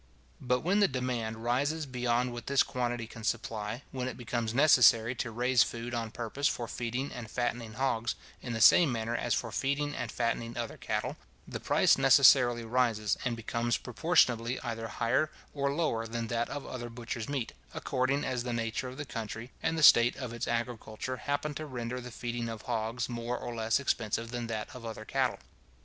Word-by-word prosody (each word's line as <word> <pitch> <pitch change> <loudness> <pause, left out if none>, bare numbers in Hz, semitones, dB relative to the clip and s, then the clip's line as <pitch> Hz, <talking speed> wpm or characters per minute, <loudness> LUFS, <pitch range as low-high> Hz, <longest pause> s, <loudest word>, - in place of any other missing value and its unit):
But 125 0 +1
when 190 +5 +2
the 200 - +6
demand 120 -4 -3
rises 145 +6 0
beyond 125 -1 0
what 120 - -7
this 140 -1 +4
quantity 120 -2 -2
can 115 0 -11
supply, 110 +1 -2
when 130 -2 -3
it 130 - -5
becomes 120 -2 -2
necessary 125 -4 +6
to 120 -1 -3
raise 120 +2 +2
food 115 +2 -1
on 115 -2 -2
purpose 120 +6 -1
for 120 - -2
feeding 120 +4 -3
and 115 -3 -7
fattening 120 -1 -2
hogs, 120 -1 0 0.3
in 120 - -4
the 110 - -2
same 150 - +7
manner 115 0 -2
as 120 -2 0
for 115 - -3
feeding 140 +4 -1
and 120 -5 -4
fattening 115 0 -2
other 115 -1 -3
cattle, - - -3 0.3
the - - -5
price - - +3
necessarily 130 -3 +6
rises, 115 -3 +1
and 120 -2 0
becomes 115 +1 -1
proportionably 125 -4 +2
either 115 -2 -4
higher 120 +8 +1 0.2
or 140 -1 0
lower 140 -7 0
than 115 0 -3
that 120 0 -1
of 145 -1 -5
other 120 -2 -6
butcher's 120 0 -5
meat, 135 -5 -2 0.2
according 130 +2 0
as 125 -2 -1
the 120 0 -3
nature 115 +2 -2
of 125 +1 -8
the 145 - -4
country, 115 0 -6
and 165 - 0
the 155 - 0
state 120 -3 +8
of 125 -3 -6
its 120 - -3
agriculture, 120 +1 -3
happen 145 +3 -2
to 155 +1 -5
render 125 -1 -4
the 125 - -8
feeding 120 0 -4
of 110 -2 -6
hogs 115 +1 -2
more 120 0 -3
or 120 - -5
less 115 +1 +1
expensive 115 -3 -1
than 120 -1 -3
that 110 -2 -3
of 125 - -9
other 110 -1 -6
cattle. 130 0 0
120 Hz, 190 wpm, -30 LUFS, 115-130 Hz, 0.3 s, state